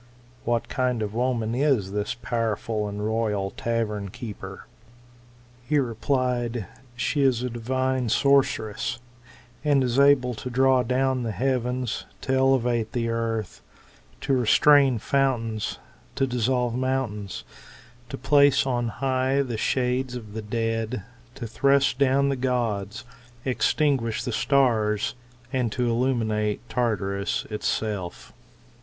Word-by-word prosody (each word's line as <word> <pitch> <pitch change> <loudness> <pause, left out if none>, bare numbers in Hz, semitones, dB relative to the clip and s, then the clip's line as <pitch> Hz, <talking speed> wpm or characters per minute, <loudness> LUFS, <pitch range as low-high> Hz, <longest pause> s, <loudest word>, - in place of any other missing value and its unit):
What 120 0 0
kind 125 -3 0
of 105 -1 -4
woman 115 -2 0
is 125 -7 +1
this 105 0 -2
powerful 115 -2 -2
and 105 +1 -4
royal 105 -3 -1
tavern 105 -4 -2
keeper? 115 0 -8 1.0
He 150 - +2
replied, 120 -2 0 0.3
She 145 +4 0
is 130 -3 +2
a 125 - -2
divine 130 +1 -1
sorceress, 120 -5 +2 0.7
and 145 -3 +3
is 125 +1 +1
able 140 -3 +5
to 125 +3 -6
draw 130 +1 +4
down 130 +1 +1
the 115 -2 -2
heavens, 125 0 -1
to 130 - -1
elevate 125 -4 +2
the 115 -1 -1
earth, 115 -3 -2 0.6
to 135 - 0
restrain 135 +2 +5
fountains, 115 -3 0 0.4
to 135 - +2
dissolve 125 -1 0
mountains, 125 -6 -2 0.7
to - - -5
place 140 +2 +4
on 120 -3 0
high 130 +3 0
the 120 -4 -4
shades 125 +2 0
of 110 -4 -8
the 110 - -4
dead, 115 0 -2 0.3
to 130 -3 -6
thrust 135 +3 +2
down 140 0 +3
the 135 - 0
gods, 120 -4 -2 0.4
extinguish 130 -3 +1
the 125 - -3
stars, 110 -4 +2 0.4
and 125 -4 0
illuminate 115 -3 0
Tartarus 100 -5 -1
itself. 105 -3 -3
120 Hz, 120 wpm, -25 LUFS, 110-130 Hz, 1.0 s, able